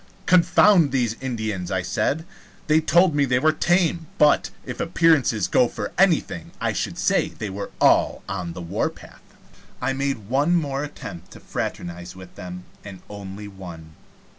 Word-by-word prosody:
"Confound 180 -2 +5
these 120 -4 0
Indians!" 110 -8 -3
I 95 -1 -1
said. 160 - -1 0.4
"They 155 +1 +3
told 175 +2 +4
me 145 -1 +2
they 125 -2 +2
were 155 +5 +4
tame; 170 0 +1
but, 150 -1 +4 0.2
if - - -6
appearances 160 - +2
go 125 +6 +4
for - - -5
anything, 165 - +1
I - - 0
should - - -3
say - - +2
they 105 -3 -6
were 100 +1 -5
all - - +3
on 90 -3 -4
the 90 - -7
warpath." 85 - -4 0.6
I 135 +2 -1
made 135 -6 -2
one 145 +8 +2
more 140 -4 -1
attempt 90 - -8
to - - -12
fraternize 85 +1 -5
with 95 -1 -12
them, 90 0 -8 0.2
and 95 -3 -10
only 100 0 -8
one. 85 -5 -10
125 Hz, 160 wpm, -23 LUFS, 95-155 Hz, 0.6 s, Confound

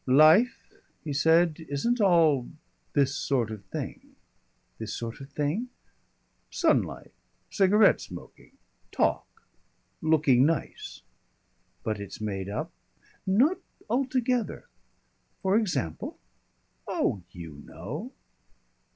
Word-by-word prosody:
"Life," 155 - +5 0.3
he 150 - -3
said, 160 +3 +3
"isn't 230 - 0
all 160 -9 +4 0.4
this 140 -1 +3
sort 120 -6 0
of 105 -2 -7
thing." 95 - -7 0.6
"This 110 -2 -4
sort 115 +2 -6
of 135 - -9
thing?" 150 - -2 0.8
"Sunlight. - - 0 0.4
Cigarette 200 +1 +5
smoking. - - -11 0.3
Talk. - - -1 0.6
Looking 150 -5 +4
nice." 155 -1 -2 0.8
"But 110 -1 -2
it's 100 -1 -8
made 100 -3 -3
up 105 - -4 0.3
" - - -32
"Not 265 - +3 0.3
altogether." 255 -2 0 0.8
"For 190 +1 +3
example?" 165 - -1 0.7
"Oh, 95 - 0
you 80 -5 -9
know." 140 - -7
150 Hz, 100 wpm, -28 LUFS, -, 0.8 s, Life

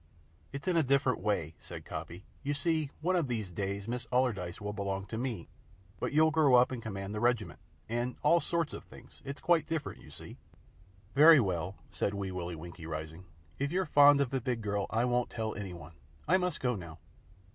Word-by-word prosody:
"It's 140 +3 -7
in 180 - +2
a 165 - +5
different 135 -2 +2
way," 90 -6 -1
said - - -9
Coppy. 90 +3 -7 0.2
"You 145 +1 -1
see, 155 -1 0
one 185 +4 +1
of 170 -6 +1
these 110 -6 -3
days 100 +2 -3
Miss 120 0 -4
Allardyce 115 -9 0
will 105 0 -4
belong 100 -1 -3
to 110 - -6
me, 120 -8 -3 0.5
but - - -2
you'll 155 +2 +5
grow 155 -5 +5
up 125 +1 +5
and 125 -3 -4
command 100 -2 -5
the 105 - -2
Regiment 110 -9 0 0.3
and 120 +2 -2
all 170 - +5
sorts 170 -2 -1
of - - -7
things. - - -16
It's 140 +1 -6
quite 170 -2 +2
different, 160 -3 -3
you - - -14
see." - - -11 0.8
"Very 155 +2 +9
well," 95 -4 -1 0.2
said 100 - -1
Wee 100 -1 -3
Willie 90 -1 -4
Winkie, 85 0 -9
rising. 80 +3 -6 0.3
"If 140 +1 -1
you're 185 +1 +1
fond 145 -1 +7
of 135 - 0
ve 135 - 0
big 125 -2 -2
girl, 100 -1 -1
I 115 +2 +1
won't 125 0 +1
tell 110 -2 -3
any 100 -3 -5
one. 85 -1 -11 0.3
I 180 +5 +5
must 180 -1 -2
go 125 -2 +1
now." 85 -5 -8
120 Hz, 205 wpm, -31 LUFS, 95-140 Hz, 0.8 s, Very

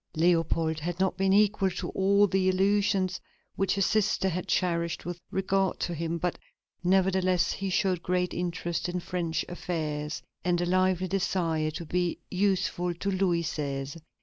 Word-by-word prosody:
Leopold 165 -1 +2
had 175 +3 -4
not 190 0 +1
been 195 0 +1
equal 205 -1 +4
to 180 -1 -4
all 200 +1 +4
the 190 -1 +2
illusions 190 -1 +1 0.3
which 195 0 +1
his 195 -2 +2
sister 210 -3 +2
had 180 0 -3
cherished 170 -2 0
with 175 0 -5
regard 195 0 0
to 175 - -2
him, 165 +1 -2
but, 175 +1 -2 0.4
nevertheless, 185 -1 +2
he 195 0 -3
showed 185 -2 +1
great 180 0 0
interest 175 0 -2
in 180 0 -2
French 170 -3 -2
affairs, 155 -4 -3 0.2
and 175 0 +1
a 175 - 0
lively 185 0 +2
desire 170 -4 0
to 165 +2 -6
be 175 +1 -1
useful 185 -2 0
to 200 +4 -2
Louis 185 -3 +1
XVI. 140 0 -4
180 Hz, 155 wpm, -28 LUFS, 170-190 Hz, 0.4 s, equal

